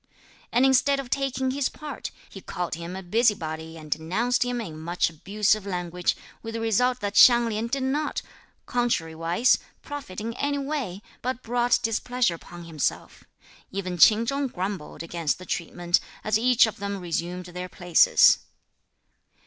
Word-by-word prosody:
And 245 +3 +4
instead 270 +1 +4
(of 255 -3 -7
taking 265 -1 0
his 275 0 0
part), 295 -4 -7 0.2
he 195 - -11
called 180 -1 -4
him 170 +3 -5
a 190 - -6
busybody 165 -6 0
and 155 -2 -11
denounced 190 - 0
him 245 0 -2
in 160 -9 -6
much 170 +1 0
abusive 205 +5 +1
language, 180 -2 -2 0.2
with 225 0 -6
the - - -2
result 245 +3 +1
that 205 0 -2
Hsiang 240 -1 +8
Lin 220 +1 -2
did 265 +2 -2
not, 290 +3 -1 0.4
contrariwise, 175 -3 +1 0.2
profit 285 -11 -7
in 225 +2 -4
any 285 +3 -1
way, 270 -10 -3 0.2
but 255 0 -3
brought 240 +1 +2
displeasure 235 -1 +1
upon 175 +1 -10
himself. 160 -3 -3 0.4
Even 185 -2 -4
Ch'in 220 +6 +7
Chung 275 +3 -1
grumbled 185 -7 -5
against 165 -2 -1
the 185 - -11
treatment, 175 +1 0 0.2
as 215 +1 +2
each 245 0 +5
of 220 - -5
them 200 0 -3
resumed 175 0 -3
their 180 +1 -6
places. 175 -1 +5
210 Hz, 155 wpm, -26 LUFS, 175-245 Hz, 0.4 s, Hsiang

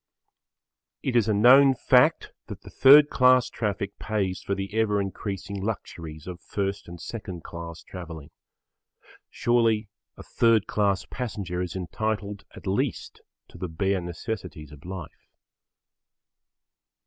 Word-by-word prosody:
It 130 - -1
is 115 -3 +4
a 110 - +2
known 130 +5 +7
fact - - +3 0.2
that - - -8
the - - -13
third 145 +2 +7
class 125 -1 +4
traffic 100 -2 -3
pays 100 -4 -2
for 100 - -2
the 95 +1 -5
ever 110 -2 +1
increasing 100 0 -4
luxuries 80 -7 -6
of 90 -1 -8
first 100 0 -3
and 85 0 -9
second 90 -2 -7
class 85 -1 -8
travelling. 80 -4 -9 1.0
Surely 115 -3 +1 0.3
a - - -10
third 115 -3 +3
class 100 -3 0
passenger 100 -8 -4
is 90 -1 -4
entitled 100 +2 -3
at - - -12
least 95 +1 -2 0.3
to - - -14
the 90 - -4
bare 95 +4 0
necessities 85 - -6
of 75 +2 -14
life. 90 -4 -9
100 Hz, 130 wpm, -26 LUFS, 90-110 Hz, 1.0 s, known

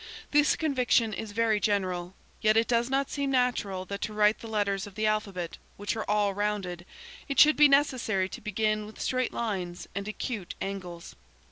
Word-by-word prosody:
This 295 +1 +4
conviction 250 -7 +2
is 215 +1 -5
very 220 0 +2
general. 185 -3 -1 0.3
Yet 215 0 +4
it 230 - +3
does 235 +1 +1
not 270 0 0
seem 280 -1 -1
natural 245 -8 0
that 200 +1 -6
to 215 - -3
write 210 0 +3
the 230 - -9
letters 205 -2 -1
of 200 - -13
the 215 0 -1
alphabet, 200 -5 -2 0.2
which 205 +2 -2
are 220 - -4
all 205 -1 +2
rounded, 195 -4 -3 0.4
it 275 - 0
should 305 +1 +8
be 295 0 +7
necessary 255 -9 +2
to - - -9
begin 215 0 -1
with 215 - -13
straight 255 -1 0
lines 185 -6 -3
and 200 +1 -4
acute 215 -2 -4
angles. 180 -3 -6
215 Hz, 180 wpm, -28 LUFS, 195-235 Hz, 0.4 s, should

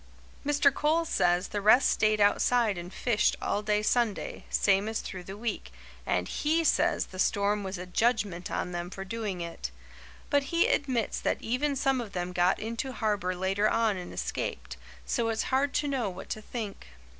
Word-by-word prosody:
Mr. 285 -1 +3
Coles 320 +3 +1
says 175 +1 +2
the 205 - -3
rest 215 +6 +6
stayed 215 -1 +2
outside 215 +1 +3
and 175 +1 -7
fished 225 +1 +1
all 205 - -1
day 210 0 +1
Sunday, 230 -2 0
same 195 +1 +2
as 220 - -2
through 185 -2 -7
the 195 +3 -8
week, 215 - -4 0.4
and 90 0 0
HE 320 +3 +1
says - - +2
the 185 - -11
storm 205 +1 +1
was 190 0 -4
a 180 - -6
judgment 200 -3 0
on 180 - -2
them 175 0 -4
for 195 +1 -7
doing 205 -3 -4
it. 170 - -5 0.6
But 285 -1 +3
he 335 +4 +2
admits 255 -6 0
that - - 0
even 275 +5 0
some 270 -1 +1
of 210 -4 -8
them 180 0 -3
got 175 +1 +3
into 230 +4 -4
harbour 205 -6 -1
later 195 +3 +1
on 225 -3 +2
and 180 -1 -7
escaped, - - -4 0.3
so 230 -1 0
it's 225 -1 0
hard 275 +2 +3
to 295 - +1
know 260 -7 0
what 185 +1 -9
to 215 - -3
think. 215 - -6
210 Hz, 185 wpm, -29 LUFS, 190-245 Hz, 0.6 s, rest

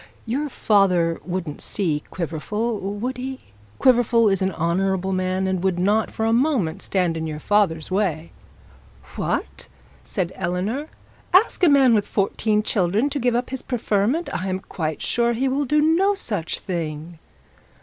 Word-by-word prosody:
Your 275 +6 -2
father 185 -8 +2
wouldn't 175 -5 -4
see 160 -7 -1
Quiverful, 210 +7 -3
would 205 +7 -4
he? 260 +1 -5 0.4
Quiverful 235 -3 +4
is 195 -1 +1
an 190 0 +1
honourable 190 +3 0
man, 185 0 0
and 190 -1 -1
would 190 -2 +1
not, 205 +4 +2
for 220 - -3
a 225 - +2
moment, 240 - +1
stand 180 -4 0
in 160 0 -3
your 150 -1 -5
father's 185 -5 +1
way.' 180 -5 -1 0.8
'What?' - - -3 0.4
said 185 -3 -3
Eleanor; 190 - -2 0.5
'ask 390 0 +4
a 350 - +7
man 270 -4 +5
with 210 -2 +2
fourteen 210 +1 0
children 210 +7 +1
to 285 - -2
give 245 -1 +1
up 245 +1 -1
his 265 - -4
preferment! 240 - 0
I 185 +2 -2
am 185 0 -2
quite 160 -5 -4
sure 235 0 +1
he 255 +4 0
will 275 +2 0
do 300 +4 +2
no 340 +7 +3
such 205 - -2
thing.' 165 -2 -5
200 Hz, 160 wpm, -22 LUFS, 180-245 Hz, 0.8 s, a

